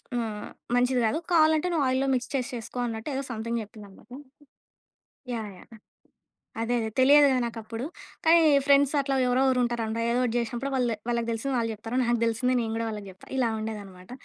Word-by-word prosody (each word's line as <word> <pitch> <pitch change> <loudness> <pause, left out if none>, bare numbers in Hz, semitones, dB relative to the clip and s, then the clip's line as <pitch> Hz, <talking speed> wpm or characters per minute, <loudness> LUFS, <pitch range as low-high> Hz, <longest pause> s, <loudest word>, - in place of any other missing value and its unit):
హ్మ్, 220 -3 -3 0.3
మంచిది 250 +1 +2
కాదు. 220 - 0
కావాలంటే 315 +1 +4
నువ్వు 310 -5 +1
ఆయిల్‌లో 260 +1 +1
మిక్స్ 250 - -2
చేసి 260 0 -1
చేసుకో 235 +2 -7
అన్నట్టు 225 +1 -5
ఏదో 270 - -2
సంథింగ్ 230 +1 -3
చెప్పిందన్నమాట. 210 0 -14 1.2
యాహ్! 220 -2 -4
యాహ్! - - -17 0.9
అదే 240 +2 0
అదే 220 -1 -3
తెలియదు‌ 285 +2 +7
గదా 255 -1 +2
నాకప్పుడు. 230 +1 -6 0.4
కానీ 335 0 +7 0.2
ఫ్రెండ్స్ 280 0 +4
అట్లా 275 0 -1
ఎవరో 255 +2 +2
ఒగరు 255 -1 +2
ఉంటారంట 230 -2 -2
ఏదో 245 +1 +1
ఒకటి 240 -1 -1
చేసినప్పుడు 240 +4 -4
వాళ్ళది 240 -3 0
వాళ్ళకి 235 -1 -1
తెలిసింది 260 +4 -2
వాళ్ళు 225 -1 -1
చెప్తారు 225 +3 -5
నాకు 240 -1 +1
తెలిసింది 250 +3 +1
నేను 225 - -3
కూడా 230 - -2
వాళ్ళకి 210 -2 -7
చెప్తా 185 - -18
ఇలా 240 -3 +2
ఉండేదనమాట. 200 -4 -7
235 Hz, 175 wpm, -27 LUFS, 225-260 Hz, 1.2 s, తెలియదు‌